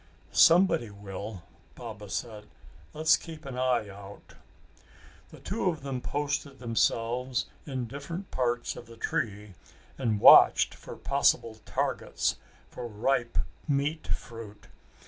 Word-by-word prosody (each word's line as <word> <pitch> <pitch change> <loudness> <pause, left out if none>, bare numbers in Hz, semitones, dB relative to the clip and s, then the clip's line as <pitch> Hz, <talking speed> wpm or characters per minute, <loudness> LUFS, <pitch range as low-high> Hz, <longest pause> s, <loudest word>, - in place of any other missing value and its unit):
"Somebody 165 - +5
will!" 100 -1 -8 0.3
Baba 110 -4 -8
said. 105 0 -5 0.4
"Let's 155 +1 +4
keep 160 -2 -10
an 135 -2 -6
eye 125 -4 +1
out." 100 0 -12 1.0
The - - -13
two 195 -1 -1
of 160 -5 -4
them 135 -3 -3
posted 145 0 -2
themselves 120 +1 0 0.2
in 130 -3 -3
different 145 - -7
parts 120 -1 -1
of 120 - -10
the 115 0 -13
tree 105 -3 -3 0.5
and 110 -5 0
watched - - +8
for - - -10
possible 110 -1 +1
targets - - -1 0.3
for 125 - -7
ripe 120 +2 0 0.3
meat 145 +2 0
fruit. 115 -3 -6
120 Hz, 120 wpm, -29 LUFS, 110-140 Hz, 1.0 s, watched